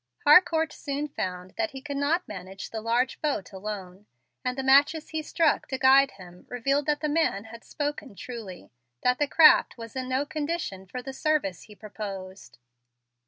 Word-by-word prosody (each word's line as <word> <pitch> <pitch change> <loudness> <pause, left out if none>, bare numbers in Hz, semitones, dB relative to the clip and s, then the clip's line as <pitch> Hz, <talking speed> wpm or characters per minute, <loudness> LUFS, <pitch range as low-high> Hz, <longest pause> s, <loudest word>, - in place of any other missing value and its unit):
Harcourt 320 +1 +5
soon 285 +1 -4
found 180 -8 -5
that 335 -1 +1
he 270 -3 -8
could 285 +1 -6
not 305 +6 0
manage 190 -1 -8
the 220 - -4
large 240 +3 0
boat 290 -10 -2
alone, 195 0 -7 0.4
and 250 0 -2
the 265 - -2
matches 285 +4 +4
he 315 -1 -3
struck 320 +1 +1
to 265 - -3
guide 270 +1 +6
him 180 -2 -14
revealed 275 +4 0
that 295 -1 +1
the 305 - 0
man 295 -10 +1
had 230 +1 -12
spoken 290 -5 -4
truly, 230 -7 -8
and - - -22 0.3
that 250 0 +2
the 290 - +2
craft 310 -1 +6
was 230 0 -9
in 260 -1 -4
no 260 +2 0
condition 290 - -4
for 250 +7 -6
the 270 +1 -6
service 280 - 0
he 210 - -14
proposed. 195 -3 -8
260 Hz, 180 wpm, -27 LUFS, 205-295 Hz, 0.4 s, guide